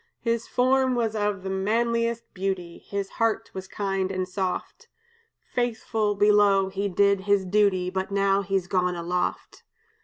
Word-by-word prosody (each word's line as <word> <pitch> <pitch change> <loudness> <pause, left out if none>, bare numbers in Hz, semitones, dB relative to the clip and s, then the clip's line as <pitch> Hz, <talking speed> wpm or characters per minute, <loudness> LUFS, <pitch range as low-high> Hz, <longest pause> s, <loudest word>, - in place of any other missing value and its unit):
His 230 -1 -1
form 260 0 +2
was 225 -2 0
of 205 -2 -1
the 190 - -4
manliest 230 +4 0
beauty; 185 -3 -3
His 200 -1 -4
heart 225 0 +1
was 190 0 -6
kind 195 -2 -2
and 185 -1 -2
soft; 190 - -4 0.7
Faithful, 220 -3 0
below, 205 -1 +4
he 200 +1 -2
did 200 +1 +3
his 200 -2 +3
duty, 185 -2 +2
But 190 0 -2
now 200 0 +2
he's 195 -2 -1
gone 180 -2 0
aloft. 175 +1 -3
200 Hz, 145 wpm, -25 LUFS, 190-220 Hz, 0.7 s, below